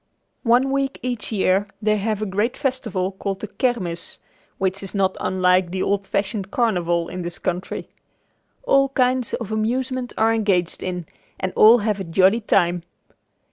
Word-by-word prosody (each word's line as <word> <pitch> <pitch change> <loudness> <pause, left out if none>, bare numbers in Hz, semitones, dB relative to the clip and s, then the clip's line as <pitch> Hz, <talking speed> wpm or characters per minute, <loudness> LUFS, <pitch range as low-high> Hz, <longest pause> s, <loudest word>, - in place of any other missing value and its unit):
One 250 +2 +3
week 275 0 -1
each 245 -3 -3
year 195 -1 +2
they 215 0 +2
have 215 +1 -1
a - - 0
great 210 +5 -1
festival 225 -9 -1
called 195 0 -4
the 215 - -5
"Kermis," 195 -8 -2 0.4
which 190 0 -1
is 195 +1 -7
not 190 -1 +1
unlike 185 -1 +2
the 185 +1 -2
old 200 0 0
fashioned 200 0 -2
carnival 175 -7 +1
in 180 - -5
this 175 0 -5
country. 180 +1 -3 0.8
All 275 - +4
kinds 255 -2 +1
of 220 -2 -6
amusements 245 +3 -1
are 225 +1 +3
engaged 195 -6 0
in 180 -2 -4 0.3
and 185 0 -2
all 225 +3 +8
have 210 -2 0
a - - -3
jolly 190 +6 +3
time. 175 -4 +2
205 Hz, 160 wpm, -22 LUFS, 185-235 Hz, 0.8 s, all